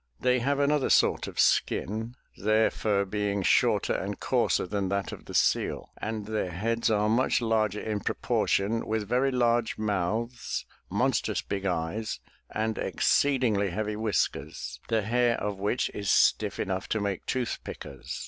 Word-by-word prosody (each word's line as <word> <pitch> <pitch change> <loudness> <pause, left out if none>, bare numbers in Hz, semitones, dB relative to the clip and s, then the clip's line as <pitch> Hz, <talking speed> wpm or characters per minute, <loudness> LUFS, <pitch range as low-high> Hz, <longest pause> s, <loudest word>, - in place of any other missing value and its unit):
They 125 0 +2
have 140 +4 0
another 145 0 +2
sort - - +3
of - - -7
skin, 110 +4 +1 0.2
their 110 +2 +2
fur 100 -2 0
being 100 0 -1
shorter - - +3
and - - -3
coarser - - +1
than 100 0 -2
that 100 0 -1
of - - -9
the - - -8
seal, - - +1
and 110 -1 -4
their 110 -3 -2
heads 115 +7 0
are 105 -1 +2
much 120 +4 +2
larger 110 -3 +1
in 105 -1 -2
proportion, 105 +2 0
with 110 -1 -1
very 125 +4 +2
large 120 -3 +1
mouths, 110 +4 -2 0.2
monstrous - - 0
big 100 -1 -3
eyes 90 +5 -2 0.3
and 110 0 -2
exceedingly 120 -8 +2
heavy 105 +3 -2
whiskers, 80 - -2
the 110 -2 +1
hair 120 +2 +2
of 105 -2 -3
which 105 +5 0
is 100 -2 -3
stiff - - +3
enough 95 -1 -2
to 110 - 0
make 100 -3 -3
tooth 125 -3 -1
pickers. 65 - -7
110 Hz, 155 wpm, -28 LUFS, 100-115 Hz, 0.3 s, sort